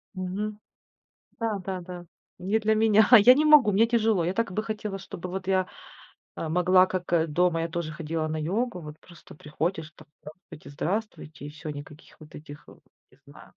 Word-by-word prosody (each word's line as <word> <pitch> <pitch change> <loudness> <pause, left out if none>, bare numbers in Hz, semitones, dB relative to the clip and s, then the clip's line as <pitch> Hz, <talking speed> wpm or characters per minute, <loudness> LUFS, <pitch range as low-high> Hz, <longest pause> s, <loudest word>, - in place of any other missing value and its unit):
Мгм. 205 +3 -4 0.8
Да, 220 -3 -1
да, 185 -1 -5
да. 175 0 -10 0.3
Не 195 +5 0
для 220 0 +1
меня. 215 -1 +4
Я 250 +5 +7
не 300 - +1
могу, 295 -8 +6
мне 215 +4 +4
тяжело. 225 -6 +1
Я 180 - -1
так 230 -4 -1
бы 215 - -2
хотела, 210 -3 -5
чтобы 180 -1 -8
вот 190 +1 -6
я, 185 -1 +2 0.7
э, 165 - -4
могла, 180 +3 +4
как, 185 -2 -5
э, 165 -1 +2
дома 170 +1 +1
я 165 - -3
тоже 165 -1 -4
ходила 160 0 -3
на 155 0 -3
йогу. 195 +6 -2
Вот 150 0 -9
просто 170 -4 -16
приходишь, 160 +1 -4
там: 155 - -17
"Здравствуйте, 155 -2 -13
здравствуйте"- 160 -1 -5
и - - -6
всё, 155 +1 -9
никаких 145 +1 -11
вот 155 0 -14
этих, 150 0 -11
э, - - -15 0.4
не - - -24
знаю. - - -16
180 Hz, 190 wpm, -26 LUFS, 160-210 Hz, 0.8 s, Я